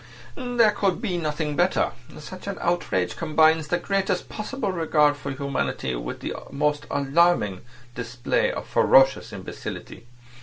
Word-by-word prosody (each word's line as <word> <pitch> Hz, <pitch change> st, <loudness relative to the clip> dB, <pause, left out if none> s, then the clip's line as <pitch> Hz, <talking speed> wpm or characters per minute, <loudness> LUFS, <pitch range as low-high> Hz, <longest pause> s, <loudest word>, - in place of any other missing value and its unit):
"There 245 Hz, -4 st, +2 dB
could 195 Hz, -3 st, 0 dB
be 185 Hz, -6 st, -2 dB
nothing 150 Hz, -1 st, -2 dB
better. 175 Hz, +3 st, +2 dB, 0.3 s
Such 185 Hz, +6 st, -10 dB
an 200 Hz, -, -3 dB
outrage 130 Hz, -, 0 dB
combines 160 Hz, -1 st, +3 dB
the 175 Hz, -, +1 dB
greatest 195 Hz, +1 st, -1 dB
possible 215 Hz, 0 st, -3 dB
regard 155 Hz, -4 st, +3 dB
for 145 Hz, 0 st, -6 dB
humanity 135 Hz, -, -2 dB
with -, -, -5 dB
the -, -, -3 dB, 0.2 s
most 150 Hz, +1 st, -1 dB
alarming 140 Hz, -, +2 dB, 0.3 s
display 120 Hz, 0 st, -1 dB
of -, -, -5 dB
ferocious 135 Hz, 0 st, +4 dB
imbecility. 120 Hz, -, -8 dB
155 Hz, 130 wpm, -24 LUFS, 140-185 Hz, 0.3 s, ferocious